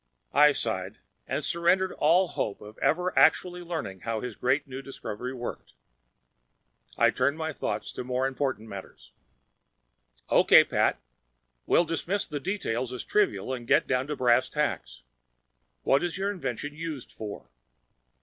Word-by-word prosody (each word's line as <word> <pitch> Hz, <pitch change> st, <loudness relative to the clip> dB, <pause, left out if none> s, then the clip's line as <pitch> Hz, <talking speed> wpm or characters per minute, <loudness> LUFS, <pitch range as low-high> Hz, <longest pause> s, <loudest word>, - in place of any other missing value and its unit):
I 150 Hz, +2 st, +7 dB
sighed 105 Hz, -6 st, -3 dB, 0.3 s
and 140 Hz, +3 st, -2 dB
surrendered 180 Hz, +2 st, +2 dB
all 175 Hz, +4 st, +3 dB
hope 100 Hz, -, -3 dB
of 105 Hz, +1 st, -12 dB
ever 180 Hz, +3 st, +1 dB
actually 180 Hz, -1 st, +4 dB
learning 160 Hz, -, -5 dB
how 115 Hz, +1 st, -3 dB
his 125 Hz, -1 st, -5 dB
great 135 Hz, +4 st, +1 dB
new 135 Hz, 0 st, -6 dB
discovery 125 Hz, -3 st, -6 dB
worked. 120 Hz, -2 st, -7 dB, 1.2 s
I -, -, +5 dB
turned 140 Hz, +4 st, +1 dB
my 160 Hz, -1 st, -3 dB
thoughts -, -, -3 dB
to -, -, -5 dB
more 125 Hz, +1 st, -1 dB
important 130 Hz, -4 st, -2 dB
matters. 100 Hz, -2 st, -10 dB, 1.2 s
"Okay, -, -, +7 dB
Pat. -, -, +1 dB, 0.7 s
We'll 175 Hz, -, +4 dB
dismiss 170 Hz, +5 st, -1 dB
the 145 Hz, -, -4 dB
details 130 Hz, -, -2 dB
as 125 Hz, -, -5 dB
trivial 395 Hz, -, +1 dB
and 120 Hz, -2 st, -6 dB
get -, -, +4 dB
down 130 Hz, +1 st, 0 dB
to 150 Hz, -, -2 dB
brass 125 Hz, -1 st, +3 dB
tacks. 145 Hz, -, -2 dB, 0.8 s
What 135 Hz, +4 st, +3 dB
is 175 Hz, 0 st, -2 dB
your 200 Hz, +1 st, 0 dB
invention 145 Hz, -, -4 dB
used 155 Hz, -4 st, -6 dB
for?" 105 Hz, -2 st, -8 dB
135 Hz, 145 wpm, -28 LUFS, 120-165 Hz, 1.2 s, I